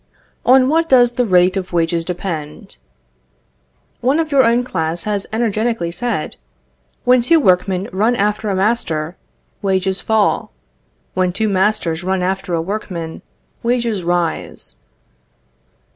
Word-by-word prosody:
On 255 +1 +6
what 325 +3 +1
does 245 -2 +5
the 245 0 0
rate 180 0 +4
of 185 -1 -3
wages 165 0 +1
depend? 170 -4 -6 1.2
One 265 +5 +2
of 320 -2 -1
your 275 -2 +5
own 235 +1 +3
class 165 -6 -2
has 205 -2 -2
energetically 220 -4 -1
said: 230 -4 -3 0.7
"When 250 0 +4
two 325 +7 +4
workmen 185 -4 +2
run 220 +6 +2
after 210 0 0
a 195 - 0
master, 185 -6 0 0.5
wages 190 -1 0
fall; 220 -2 +1 0.6
when 185 -1 +1
two 220 +4 -1
masters 190 -4 0
run 190 0 0
after 190 -1 -1
a 165 - 0
workman, 175 -4 -5 0.4
wages 235 -4 0
rise." 175 -1 -2
195 Hz, 130 wpm, -18 LUFS, 180-235 Hz, 1.2 s, On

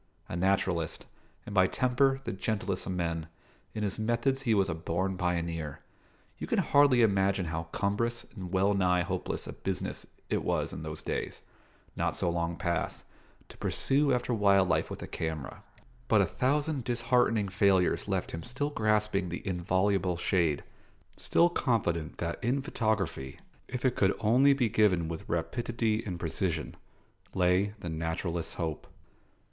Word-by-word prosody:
A - - -5
naturalist, 90 -3 0 0.4
and 105 - -7
by 95 -2 +5
temper 135 +3 +2
the - - -3
gentlest 95 -2 -2
of - - -2
men, 85 -3 -2 0.5
in 105 - -2
his 100 +1 -2
methods 120 +4 +1
he 115 -5 +2
was 100 -1 +3
a 85 - -1
born 85 +4 -2
pioneer. 85 -4 -2 0.6
You - - -4
can - - 0
hardly 140 -4 +5
imagine 100 -3 +2
how 80 0 -3
cumbrous 105 +7 -1
and 95 -4 -7
well 95 +2 +3
nigh 90 -2 +2
hopeless 95 0 -3
a - - -6
business - - -4 0.2
it - - -1
was - - -1
in - - -6
those - - -6
days, - - -4 0.5
not - - 0
so 85 - +1
long 85 0 -1
past, 85 -1 -2 0.5
to - - -13
pursue 140 +1 +2
after 125 -1 0
wild 100 -3 +4
life 85 - +1
with - - -6
a - - -6
camera; 80 -3 -4 0.5
but 110 - +4
a 100 - +5
thousand 140 - 0
disheartening 120 -3 +2
failures 95 -1 +2
left - - -1
him 80 - -5
still 135 - -2
grasping 105 -5 +1
the 85 - -6
inviolable 95 0 +1
shade, 85 -5 +1 0.5
still 170 - +3
confident 100 - 0
that 85 +5 -4
in 130 +3 +1
photography, 105 - -1 0.3
if 125 +1 -4
it 125 - +3
could 95 0 +2
only 130 +6 +5
be 130 -4 +2
given 100 -6 +3
with 80 -1 -6
rapidity 110 +5 -1
and 90 -4 -5
precision, 80 -1 -2 0.6
lay 95 +3 +2
the 85 - -4
naturalist's 80 +1 -3
hope. 80 -4 -3
95 Hz, 155 wpm, -30 LUFS, 85-115 Hz, 0.6 s, by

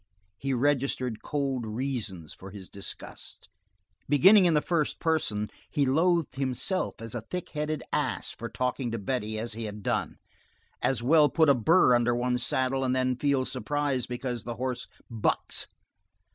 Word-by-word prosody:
He 135 - -2
registered 130 -3 0
cold 135 -4 -2
reasons 110 - -4
for 95 - -11
his 95 -2 -10
disgust. 100 -2 -9 0.6
Beginning 190 +8 +7
in 170 -2 +4
the - - +5
first 165 -4 0
person, 135 -11 0 0.2
he 145 -3 +1
loathed 165 +2 +2
himself 135 +8 -1
as 115 -1 -7
a 120 - -3
thick 180 +11 -6
headed 150 0 -3
ass - - -1
for - - -7
talking 125 0 -2
to 115 - -3
Betty 110 0 -2
as 115 +1 -3
he 115 +1 -5
had 105 -1 -7
done; - - -1 0.6
as 130 -3 +1
well 150 +3 +5
put 160 -3 +4
a - - +8
burr 130 +2 +5
under 120 0 +3
one's 125 0 0
saddle 130 +1 +1
and 130 0 +1
then 130 0 +1
feel 135 0 +1
surprise 140 -1 -1
because 125 -1 -4
the 120 +1 -5
horse 125 +1 -3 0.2
bucks. 115 -3 -1
130 Hz, 160 wpm, -28 LUFS, 115-145 Hz, 0.6 s, a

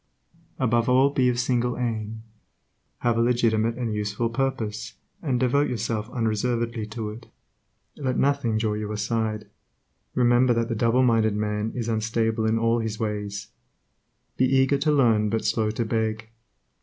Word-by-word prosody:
Above 120 -1 +1
all 130 +2 +4
be 130 -3 +2
of 120 -1 0
single 125 0 0
aim; 110 -2 -3 0.8
have 120 -1 +1
a - - +4
legitimate 115 -2 +2
and 120 -3 -2
useful 105 +2 -2
purpose, 115 -4 -2 0.3
and 130 -6 0
devote 135 +3 +2
yourself 110 -1 -2
unreservedly 115 0 -1
to 110 0 -5
it. 110 +3 -11 0.7
Let 130 -3 -1
nothing 135 -5 +1
draw 110 -1 0
you 105 0 -4
aside; 110 0 -2 0.7
remember 120 0 +4
that 115 0 0
the 115 - -1
doubleminded 115 -2 +3
man 105 +1 -1
is 120 -2 -3
unstable 110 0 0
in 110 +1 +2
all 115 +1 +2
his 110 -1 -3
ways. 105 -1 -3 0.9
Be 130 - +4
eager 135 +1 +3
to 150 +2 +2
learn, 115 -7 +3
but 110 +1 -1
slow 110 0 +1
to 110 +2 -2
beg. 110 0 -2
115 Hz, 150 wpm, -25 LUFS, 110-125 Hz, 0.9 s, all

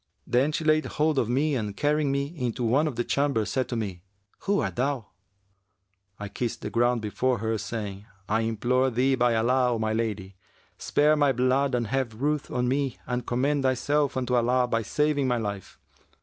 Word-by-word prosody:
Then 130 +5 +2
she 160 +2 -2
laid 155 0 +3
hold 150 -2 +1
of 115 - 0
me 145 +5 +1
and 105 -6 -3
carrying 150 -1 +1
me 140 +3 -2
into 125 -4 -2
one 135 +7 +2
of 140 - -4
the 120 - 0
chambers, 140 -7 0
said 130 -1 -1
to 120 - -2
me, 100 -6 -4 0.4
'Who 200 0 0
art - - -3
thou?' 130 -3 -1 1.1
I 105 - -5
kissed 115 +3 -4
the 105 - -5
ground 120 +1 +1
before 125 +4 0
her 110 +1 -1
saying, 105 -2 -5 0.2
'I 110 +2 +1
implore 120 +4 +1
thee 130 +3 +1
by 120 -2 +2
Allah, 125 +2 +2
O - - -1
my 110 0 -1
lady, 105 -4 -3 0.4
spare 150 +1 +3
my 145 -2 +3
blood 130 +2 +1
and 120 -1 0
have 120 -1 -2
ruth 150 +1 -1
on 125 0 -1
me 135 0 0
and 125 0 -3
commend 140 +4 +1
thyself 135 +2 +1
unto 125 -1 -1
Allah 125 +1 +2
by 115 -1 0
saving 145 +3 0
my 125 -1 +1
life!' 100 -4 -5
125 Hz, 190 wpm, -26 LUFS, 115-140 Hz, 1.1 s, laid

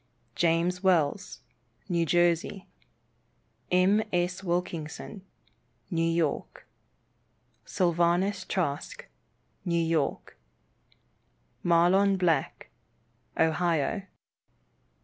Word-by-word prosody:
James 170 +4 +1
Wells, 180 -2 +1 0.5
New 170 -3 0
Jersey. 175 +3 +1 1.0
M. 185 +4 +4
S. 180 +1 -1
Wilkinson, 175 +1 -4 0.7
New 165 -2 0
York. 165 -3 -2 1.0
Sylvanus 175 +3 +1
Trask, 185 - -3 0.6
New 170 -2 0
York. 160 - -1 1.2
Mahlon 180 +3 +4
Black, 165 -7 -1 0.7
Ohio. 165 +3 +1
175 Hz, 65 wpm, -28 LUFS, 165-185 Hz, 1.2 s, M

